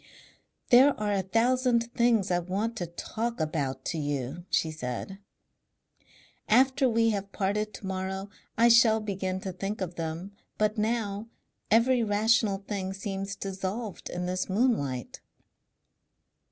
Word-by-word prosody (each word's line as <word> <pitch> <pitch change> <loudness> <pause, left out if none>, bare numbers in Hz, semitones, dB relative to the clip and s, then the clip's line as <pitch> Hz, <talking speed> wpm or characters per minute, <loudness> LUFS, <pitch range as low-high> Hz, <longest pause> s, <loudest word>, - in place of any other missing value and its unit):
"There 260 +2 +7
are 210 -1 0
a 195 - +1
thousand 235 +3 +1
things 235 -7 +2
I 175 - +3
want 200 +6 -2
to 175 - -3
talk 225 +7 -4
about 145 -4 -2
to 165 - -2
you," 145 +3 -3
she 160 - +1
said. 155 +6 -5 1.3
"After 260 +3 +4
we 230 -1 +3
have 200 -1 -3
parted 210 +2 -1
to - - -9
morrow 190 +1 -4 0.3
I 230 +1 +6
shall 230 -1 +6
begin 190 -3 -3
to 190 - -4
think 195 +3 -4
of 180 -2 -4
them. 165 +4 -4 0.3
But 215 0 +1
now 215 -1 -1 0.4
every 240 +3 +4
rational 215 -1 +2
thing 190 -2 -3
seems 195 0 -4
dissolved 195 +3 -5
in 180 0 -3
this 185 +1 -2
moonlight...." 185 - 0
200 Hz, 135 wpm, -28 LUFS, 185-230 Hz, 1.3 s, There